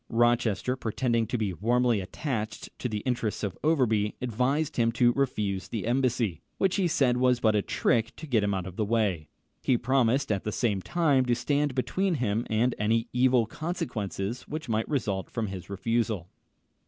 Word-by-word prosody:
Rochester, 120 -1 +2
pretending 115 -1 0
to 125 - -1
be 105 -4 -1
warmly 120 +3 +2
attached 110 - -4
to 125 - -2
the 105 -2 -3
interests 120 -4 -2
of 100 -4 -2
Overbury, 115 -10 +2
advised 130 +6 0
him 115 -1 +3
to 120 +1 +4
refuse 105 -8 -1
the 110 - -4
embassy, 120 - 0 0.2
which 190 0 +1
he 190 -3 +2
said 130 -6 +2
was 125 -1 +3
but 110 -2 +3
a 105 - +3
trick 115 +3 0
to 160 - -8
get 120 -8 +2
him 100 - +1
out 95 -2 -2
of 95 -1 -8
the 110 - +1
way. 100 -8 0 0.3
He 125 - +2
promised, 130 +1 +2
at 100 -2 0
the 105 - -2
same 105 -4 0
time, 145 - +2
to 120 -1 +2
stand 145 +2 0
between 185 +8 0
him 115 -3 -1
and 115 +3 +2
any 115 +2 +1
evil 125 -1 +4
consequences 115 - -4
which 155 -1 -5
might 110 -1 -1
result 105 -9 -1
from 115 -2 -2
his 95 -2 -7
refusal. 105 -2 -1
115 Hz, 180 wpm, -28 LUFS, 105-130 Hz, 0.3 s, to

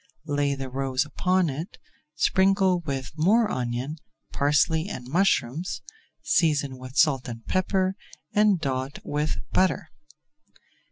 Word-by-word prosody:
Lay 145 -2 0
the 135 -1 -5
roes 135 +1 -1
upon 180 +5 +1
it, 155 +7 -5 0.4
sprinkle 190 +2 +3
with 135 -5 -4
more 205 +8 +3
onion, 125 +5 -3 0.4
parsley, 155 +5 +2
and 125 -11 -6
mushrooms, 170 -1 0 0.4
season 145 -5 +1
with 130 +2 -9
salt 135 -4 +3
and 115 -2 -8
pepper 185 0 +1 0.4
and 210 -3 +4
dot 135 -2 -2
with 150 +1 -1
butter. 175 -4 +1
150 Hz, 115 wpm, -26 LUFS, 135-185 Hz, 0.4 s, and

